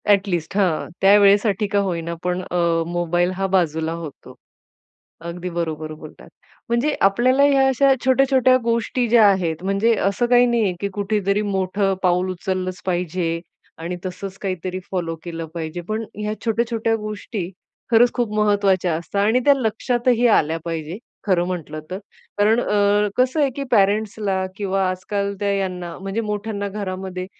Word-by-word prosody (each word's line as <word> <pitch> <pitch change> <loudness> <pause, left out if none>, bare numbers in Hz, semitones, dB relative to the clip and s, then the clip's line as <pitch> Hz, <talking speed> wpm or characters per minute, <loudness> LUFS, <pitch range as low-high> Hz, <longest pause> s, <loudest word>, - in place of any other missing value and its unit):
At 200 0 +4
least 175 -2 -3
हां, 180 -6 +1
त्या 195 +2 +7
वेळेसाठी 205 0 +3
का 205 - +3
होईना, 170 -4 -2
पण 180 0 -1
अ, - - -2 0.3
मोबाईल 175 +1 0
हा 195 0 0
बाजूला 165 -4 0
होतो. 165 -4 -9 0.9
अगदी 170 +2 -5
बरोबर 160 -2 -3
बोलतात. 155 - -13 0.4
म्हणजे 240 +6 +1
आपल्याला 245 +8 +4
ह्या 275 -1 +4
अशा 270 +1 +4
छोट्या-छोट्या 260 -1 +4
गोष्टी 235 +1 0
ज्या 230 -2 +6
आहेत, 175 -3 -2
म्हणजे 195 +4 +2 0.2
असं 200 +5 0
काही 245 0 +5
नाहीये 230 -6 +1
की 200 - -1
कुठेतरी 205 0 0
मोठं 195 -1 0
पाऊल 180 +1 +2
उचललंच 185 0 -3
पाहिजे 175 -2 -1 0.4
आणि 170 +2 -4
तसंच 190 +1 -6
काहीतरी 185 -1 -3
फॉलो 170 -3 -2
केलं 165 -1 -5
पाहिजे, 165 0 -5
पण 215 +5 -4
ह्या 210 0 -3
छोट्या-छोट्या 225 0 0
गोष्टी 210 -3 -5 0.4
खरंच 235 +1 +5
खूप 240 -4 -1
महत्त्वाच्या 200 -5 +2
असतात 170 +5 -2
आणि 225 +4 +3
त्या 285 - +7
लक्षातही 240 0 +1
आल्या 165 -7 +3
पाहिजे 165 +1 -4 0.3
खरं 180 -3 +2
म्हटलं 160 -4 -5
तर. 185 - -3 0.4
कारण 215 +3 +3
अ, 205 -1 +2
कसं 255 +5 +2
आहे 280 - +3
की 280 - -3
पॅरेंट्सला 200 -1 +1
किंवा 195 -2 0
आजकाल 200 +2 -3
त्या 205 -1 0
यांना 180 -3 -3
म्हणजे 195 +4 -3
मोठ्यांना 210 -1 -3
घरामध्ये, 190 -2 -5
195 Hz, 150 wpm, -21 LUFS, 180-220 Hz, 0.9 s, त्या